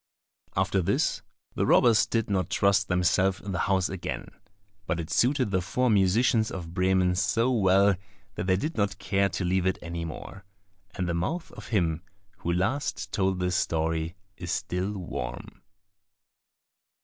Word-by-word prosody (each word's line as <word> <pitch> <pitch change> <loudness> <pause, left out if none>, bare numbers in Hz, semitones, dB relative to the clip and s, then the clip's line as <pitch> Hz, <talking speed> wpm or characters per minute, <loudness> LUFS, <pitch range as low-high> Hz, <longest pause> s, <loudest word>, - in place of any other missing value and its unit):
After 95 +1 +2
this 85 - 0 0.3
the - - 0
robbers 115 -3 +5
did 115 -2 0
not 95 -4 0
trust 100 0 +2
themselves 90 +1 +2
in 100 - -6
the 85 - -2
house 95 -1 +2
again; 95 -2 -5 0.6
but 85 - -1
it 80 - -5
suited 130 -3 +2
the 95 -1 +1
four 125 +7 +1
musicians 110 +3 +3
of 85 -3 -7
Bremen 90 0 +2
so 100 +7 +1
well 100 -3 +4 0.4
that - - -4
they 95 - +4
did 155 - -3
not 100 -2 0
care 100 0 +1
to 90 +1 -3
leave 95 +1 +1
it 95 - +1
any 85 0 -5
more. 95 +5 -8 0.5
And 90 - -2
the 85 - -1
mouth 160 - -2
of - - -11
him 85 -7 0 0.4
who 85 - -2
last 100 +11 -1
told 95 -2 0
this 90 0 0
story 80 0 -1 0.2
is 85 -1 -7
still 100 0 -2
warm. 70 -10 -6
95 Hz, 160 wpm, -27 LUFS, 90-100 Hz, 0.6 s, robbers